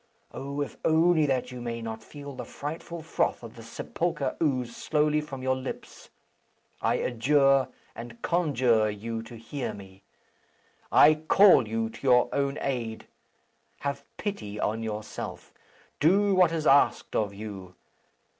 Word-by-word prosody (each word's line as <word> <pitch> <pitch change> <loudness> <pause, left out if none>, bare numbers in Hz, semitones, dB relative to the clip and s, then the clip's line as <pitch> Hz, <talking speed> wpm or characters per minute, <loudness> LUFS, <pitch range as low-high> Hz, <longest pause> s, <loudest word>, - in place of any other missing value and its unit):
Oh! 140 +1 -5
if 145 - -5
only 160 -1 +4
that 130 -2 -1
you 125 -1 -7
may 115 -1 -4
not 110 -1 -6
feel 145 +4 -10
the - - -6
frightful 160 +3 -7
froth 165 - -1
of 115 0 -10
the 115 - -11
sepulchre 140 +4 -3
ooze 125 -6 0
slowly 150 0 +1
from 135 -4 -8
your 130 0 +2
lips, 130 0 -8 0.7
I - - +2
adjure 135 +2 +3 0.3
and 115 0 -9
conjure 130 -10 +2
you 115 +2 -4
to 115 +1 -11
hear 130 +4 -5
me. 95 -1 -13 0.9
I 155 - +7
call 155 - +5
you 115 +1 -1
to - - -13
your 125 -2 +4
own 140 0 0
aid. 120 -5 -3 0.8
Have 140 0 -3
pity 105 - -4
on 110 +2 -1
yourself. 110 -1 -6 0.5
Do 195 +6 +4
what 180 -3 +5
is 160 -2 -2
asked 140 0 +3
of 105 -2 +1
you. 100 -3 -8
130 Hz, 145 wpm, -27 LUFS, 115-150 Hz, 0.9 s, I